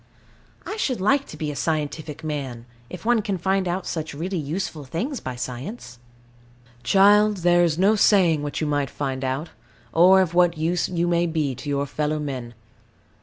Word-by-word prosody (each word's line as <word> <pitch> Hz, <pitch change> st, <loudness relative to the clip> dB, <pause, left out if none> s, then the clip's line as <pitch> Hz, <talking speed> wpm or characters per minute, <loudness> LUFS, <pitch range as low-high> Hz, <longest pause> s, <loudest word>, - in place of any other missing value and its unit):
I 420 Hz, -, -5 dB
should 260 Hz, -, -1 dB
like 275 Hz, +9 st, +2 dB
to -, -, -10 dB
be 155 Hz, -2 st, -3 dB
a -, -, -7 dB
scientific 155 Hz, 0 st, -3 dB
man, 135 Hz, -6 st, -4 dB, 0.2 s
if 180 Hz, -, -9 dB
one 240 Hz, -1 st, +3 dB
can 200 Hz, -2 st, -2 dB
find 190 Hz, +1 st, 0 dB
out 180 Hz, +2 st, -2 dB
such 160 Hz, -3 st, -4 dB
really 175 Hz, +4 st, -3 dB
useful 155 Hz, 0 st, -4 dB
things 220 Hz, -, -3 dB
by 130 Hz, -, -6 dB
science. 125 Hz, -, -7 dB, 0.8 s
Child, 205 Hz, +8 st, +5 dB
there 175 Hz, 0 st, +5 dB
is 165 Hz, -2 st, +1 dB
no 200 Hz, +4 st, +4 dB
saying 180 Hz, -7 st, +4 dB
what 145 Hz, 0 st, -4 dB
you 155 Hz, -, -1 dB
might 145 Hz, -2 st, 0 dB
find 135 Hz, -1 st, -4 dB
out, 135 Hz, +5 st, -2 dB, 0.4 s
or 185 Hz, +3 st, +6 dB
of 175 Hz, -3 st, -1 dB
what 175 Hz, -1 st, +3 dB
use 165 Hz, +3 st, 0 dB
you 175 Hz, -1 st, 0 dB
may 175 Hz, 0 st, +2 dB
be 155 Hz, -4 st, -1 dB
to 145 Hz, -, -7 dB
your 140 Hz, 0 st, 0 dB
fellow 150 Hz, +2 st, -2 dB
men. 130 Hz, -5 st, -5 dB
165 Hz, 180 wpm, -23 LUFS, 145-190 Hz, 0.8 s, or